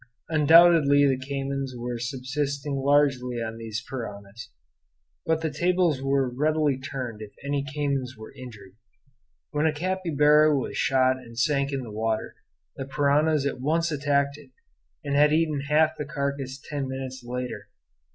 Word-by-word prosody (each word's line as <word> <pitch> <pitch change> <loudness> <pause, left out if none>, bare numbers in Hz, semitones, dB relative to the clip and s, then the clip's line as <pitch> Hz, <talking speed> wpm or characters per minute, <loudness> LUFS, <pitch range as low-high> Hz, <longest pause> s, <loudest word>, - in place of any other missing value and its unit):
Undoubtedly 155 -2 +6
the 135 - +2
caymans 135 0 -4
were 120 0 -4
subsisting 140 +3 -3
largely 135 -3 +2
on 115 0 -4
these 115 0 -5
piranhas. 115 -1 -7 0.8
But 160 0 +1
the 160 -1 -2
tables 175 -3 +1
were 135 -1 +1
readily 150 +2 0
turned 130 -5 -6
if 105 -1 -8
any 140 0 0
caymans 140 -4 -2
were 110 0 -11
injured. 110 -8 -11 0.8
When 150 +1 +1
a - - +2
capybara 155 -3 +3
was 130 - -4
shot 130 -1 +2
and 115 -3 -13
sank 140 +2 +1
in 135 -2 -3
the 115 - -8
water, 110 +1 -2 0.4
the 135 - -5
piranhas 145 +2 +2
at 135 -3 -3
once 165 +4 +1
attacked 140 0 0
it, 145 -3 -16 0.5
and 140 -1 -3
had 150 +1 +5
eaten 155 -3 +1
half 155 +1 +3
the 150 - -5
carcass 140 -2 -4
ten 140 -1 -4
minutes 130 0 -6
later. 125 -4 -5
140 Hz, 150 wpm, -26 LUFS, 125-150 Hz, 0.8 s, Undoubtedly